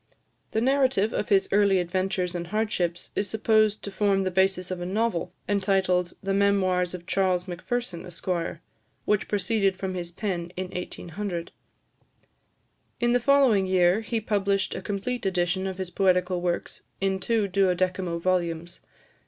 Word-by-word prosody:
The 220 - 0
narrative 260 -5 +2
of - - -2
his 195 -1 +4
early 200 -1 +4
adventures 185 0 -1
and 170 -1 -4
hardships 180 -4 -1
is 200 - 0
supposed 215 0 +2
to 200 - -5
form 195 -1 +2
the 185 - -1
basis 190 0 +1
of 180 -1 -4
a - - -3
novel, 190 -3 -1 0.2
entitled 190 -3 +1
"The 195 0 0
Memoirs 185 -3 +2
of 175 -1 -10
Charles 185 -1 +1
Macpherson, 185 +1 -3
Esq.," 175 +1 -9 0.8
which 210 0 +1
proceeded 195 -1 +1
from 190 -1 -3
his 175 -2 -4
pen 175 -3 -3
in 185 0 -3
1800. 180 0 -5 1.5
In 240 0 +2
the 245 - +4
following 245 -7 +4
year, 185 +2 +3
he 225 +1 -2
published 200 -2 0
a - - -5
complete 215 +5 -3
edition 185 +1 0
of 190 -1 -4
his 185 -2 -4
poetical 180 -1 +2
works, 175 -1 -2 0.2
in 190 0 0
two 220 +1 +1
duodecimo 185 -2 +1
volumes. 170 -1 -1
190 Hz, 150 wpm, -26 LUFS, 180-205 Hz, 1.5 s, his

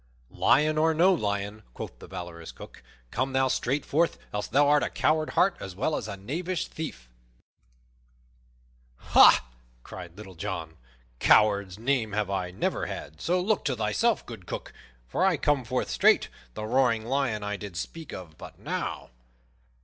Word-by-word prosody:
"Lion 155 +1 +3
or 160 0 +3
no 180 +4 +5
lion," 105 - -2
quoth - - -7
the - - -11
valorous 85 -2 -7
Cook, - - -12 0.3
"come 130 +1 -1
thou 130 0 +3
straight 135 +3 0
forth, 165 +4 +1 0.2
else 105 0 -2
thou 140 +5 +4
art 145 0 +5
a - - 0
coward 155 0 +1
heart 190 0 +4
as 95 -2 -7
well 140 +9 0
as - - -4
a 100 - -6
knavish 165 - -3
thief." 145 - -7 1.9
"Ha!" - - +6 0.4
cried 85 -1 -10
Little 100 -3 -10
John, 85 -3 -5 0.4
"coward's 100 -3 +4
name 115 -2 0
have 105 -2 -1
I 95 -2 -1
never 90 - -2
had; 80 +2 -7
so, 180 +2 +1
look 205 +3 +1
to 135 - +1
thyself, 115 - +1
good 110 -7 -10
Cook, - - -6 0.3
for 180 - 0
I 190 -4 +3
come 145 -2 +1
forth 125 - -2
straight, - - +4 0.3
the 110 - -4
roaring 115 -2 +2
lion 125 -4 0
I 105 0 -2
did 100 -4 -7
speak 160 - -6
of 85 -4 -9
but - - -10
now." - - -4
115 Hz, 165 wpm, -27 LUFS, 100-150 Hz, 1.9 s, Ha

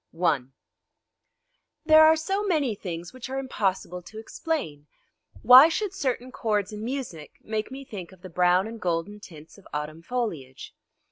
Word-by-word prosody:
I 155 -8 +2 1.4
There 315 0 +8
are 315 0 +7
so 385 +6 -2
many 305 - +1
things 175 -4 -7
which 255 0 -8
are 265 - -3
impossible 190 -8 -2
to 215 +5 -13
explain! 220 - -4 0.6
Why 260 +5 +10
should 400 +3 -2
certain 255 -6 -2
chords 215 -4 -1
in 210 0 -6
music 235 - -5
make 215 0 -3
me 270 +1 -9
think 190 -8 -8
of 190 -1 -18
the 185 - -8
brown 180 +2 +3
and 225 0 -8
golden 175 +4 -2
tints 160 -2 -14
of 195 - -18
autumn 150 +2 -5
foliage? 170 - -5
215 Hz, 155 wpm, -26 LUFS, 175-265 Hz, 1.4 s, Why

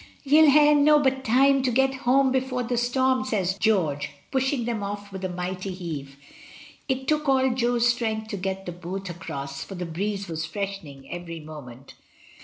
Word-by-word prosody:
"Ye'll 305 +2 +6
ha'e 295 +1 +6
nobbut 290 -2 +4
time 270 +3 +4
to 260 - +1
get 265 +2 +2
hoam 265 0 +2
before 255 -1 -1
the 245 +1 -2
storm," 255 +2 +1
says 195 -7 -1
George, 180 -9 +1 0.2
pushing 265 -2 0
them 235 -2 -2
oif 205 0 -5
with 190 0 -7
a 185 - -1
mighty 180 +2 -4
heave. 155 -7 -6 0.7
It 265 0 -1
took 305 -1 +1
all 265 -1 +3
Jo's 240 -1 +2
strength 220 -2 -1
to 205 - -4
get 190 0 -4
the 175 - -4
boat 180 +2 -6
across, 140 -5 -6
for 195 - -9
the 180 0 -4
breeze 195 +4 -3
was 160 -1 -4
freshening 160 -6 -6
every 175 -1 -6
moment. 140 -5 -11
210 Hz, 175 wpm, -25 LUFS, 175-260 Hz, 0.7 s, Ye'll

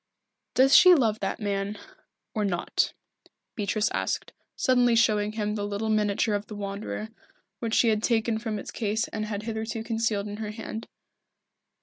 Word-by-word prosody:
"Does 270 +2 +6
she 365 0 +9
love 225 -7 +2
that 195 - -2
man 200 0 -2 0.6
or 215 - 0
not?" 185 -4 0 0.6
Beatrice 210 0 0
asked, - - -2 0.2
suddenly 245 -2 +3
showing 215 -2 +3
him 210 -1 -1
the 210 -1 -3
little 205 +2 -2
miniature 210 0 +1
of 205 0 -2
the 210 - -8
Wanderer, 205 +2 -5 0.5
which 230 -1 -1
she 235 - +4
had 215 -1 +1
taken 225 -1 +1
from 220 -2 -3
its - - -7
case 220 0 -1
and 215 -1 -3
had 210 -1 -4
hitherto 220 0 -3
concealed 225 -3 -1
in 205 0 -6
her 215 -1 -4
hand. 220 +1 -6
215 Hz, 160 wpm, -27 LUFS, 205-225 Hz, 0.6 s, she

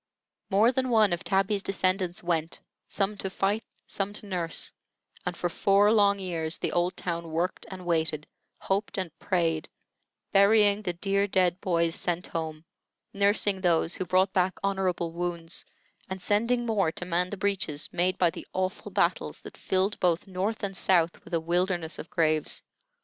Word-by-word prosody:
More 215 +4 +5
than 260 0 -1
one 215 -5 +4
of 175 - -3
Tabby's 195 +2 +1
descendants 185 -2 0
went, 165 -2 -1 0.3
some 200 +1 0
to 190 - -3
fight, 200 +3 0 0.2
some 200 0 -3
to 210 - -8
nurse; 175 -4 -1 0.6
and - - -2
for 175 - 0
four 200 +4 +3
long 200 -2 +4
years 170 -4 -2
the - - -2
old 175 +1 0
town 170 -1 -3
worked 170 +3 -2
and 185 -2 -8
waited, 160 -3 0 0.4
hoped 195 +2 -1
and 185 -4 -2
prayed, 165 -4 0 0.6
burying 205 +1 +5
the 180 -4 -2
dear 200 +3 0
dead 185 -2 +1
boys 170 -2 +1
sent 175 0 -1
home, 160 -1 -5 0.5
nursing 200 -1 +2
those 170 -1 +2
who - - -1
brought 185 +3 +3
back 185 -1 +1
honorable 190 -4 0
wounds, 170 -1 -3 0.4
and 190 0 -4
sending 235 +5 +1
more 200 -8 +1
to 180 - -6
man 180 +1 +1
the 205 - -5
breaches 190 -7 -1
made 180 +2 +1
by 175 -2 +3
the - - -9
awful 185 +2 -2
battles - - 0
that - - -11
filled 190 +3 0
both 175 -2 +2
North 195 +4 -3
and 195 -1 -2
South 175 -3 +2
with 175 - -4
a - - +2
wilderness 175 -1 -1
of - - -7
graves. 155 -6 +1
185 Hz, 165 wpm, -28 LUFS, 170-200 Hz, 0.6 s, More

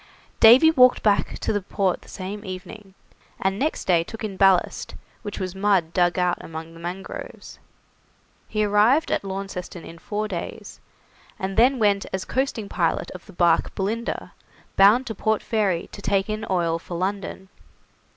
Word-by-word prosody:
Davy 255 +8 +8
walked 255 -5 +5
back 205 -2 +1
to - - -2
the 205 - 0
port 190 -1 -1
the - - -19
same 200 +2 -7
evening, 190 +1 -9 0.4
and 195 +1 -1
next 305 +3 -1
day 175 -3 +3
took 225 +6 -9
in 205 -3 -4
ballast, 190 -1 +2 0.3
which 205 -3 -6
was 185 -2 -3
mud 190 -4 +1
dug 175 -1 +2
out 180 -1 +1
among 160 0 -8
the 165 - -13
mangroves. 180 +3 -8 0.9
He 215 -1 -1
arrived 215 +10 +3
at - - 0
Launceston 190 -3 -6
in 165 - -11
four 210 +3 -3
days, 180 -5 -7 0.6
and 190 0 -4
then 255 +4 +4
went 205 -3 +2
as 190 -1 -3
coasting 260 -5 -2
pilot 170 -4 -1
of 185 +2 -11
the 200 - -13
barque 170 -1 +2
'Belinda', 220 +4 -3 0.4
bound 210 +7 +6
to 225 - -4
Port 220 +1 0
Fairy 200 -6 0
to 205 - -10
take 195 +1 0
in 215 +1 -4
oil 170 -3 0
for 170 +1 -7
London. 190 0 -4
195 Hz, 165 wpm, -23 LUFS, 185-215 Hz, 0.9 s, Davy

